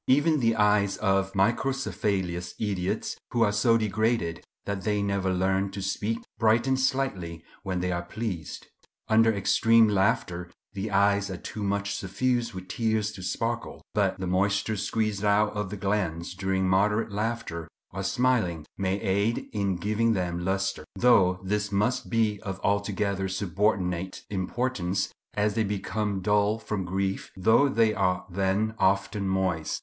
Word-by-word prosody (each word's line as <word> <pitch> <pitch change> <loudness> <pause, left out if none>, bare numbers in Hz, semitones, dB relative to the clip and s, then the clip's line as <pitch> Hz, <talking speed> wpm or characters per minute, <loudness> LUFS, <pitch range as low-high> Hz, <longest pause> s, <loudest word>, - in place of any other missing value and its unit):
Even 145 +4 +4
the 115 -2 +2
eyes 105 -2 +3
of 95 -1 +1
microcephalous 100 -5 0
idiots, 95 -4 -2
who 120 -1 +2
are 105 - +3
so 115 +3 +3
degraded 110 -5 0 0.2
that 100 -1 -3
they 105 +1 0
never 100 -2 0
learn 95 +1 +1
to 100 +1 -7
speak, 100 +3 -1 0.2
brighten 120 +4 +3
slightly 130 -12 -1 0.2
when 95 -3 -2
they 90 0 -1
are 85 -1 -1
pleased. 90 -3 -5 0.4
Under 115 +1 +5
extreme 115 +2 +4
laughter 95 -4 0 0.2
the 100 +1 -3
eyes 100 0 +2
are 95 - -4
too 105 - -7
much 100 0 -1
suffused 120 +4 -1
with 95 0 -7
tears 110 +1 0
to 95 - -10
sparkle; 115 +5 -3
but - - +1
the 95 - -4
moisture 100 +4 +1
squeezed 105 0 -1
out 105 +1 +3
of 105 -2 -3
the 105 - -5
glands 95 -4 -1
during 95 0 0
moderate 105 +4 +2
laughter 105 -6 -3 0.2
or 95 - -4
smiling 95 -6 +1
may 95 +1 0
aid 100 +4 0
in 100 -3 0
giving 110 +5 +1
them 85 -3 -2
lustre; 95 +1 -1
though 100 -7 +4
this 105 +1 -1
must 105 +6 0
be 110 -3 +1
of 95 -1 -5
altogether 100 -1 0
subordinate 95 -1 -1
importance, 100 -1 -1 0.3
as 105 0 +1
they 110 - +1
become 100 0 -2
dull 105 +2 +2
from 105 -4 -4
grief, 95 +2 -2
though 110 +9 +4
they 115 -4 +3
are 90 -2 0
then 100 +4 0
often 100 +1 +1
moist. 95 -4 0
100 Hz, 150 wpm, -27 LUFS, 95-110 Hz, 0.4 s, Under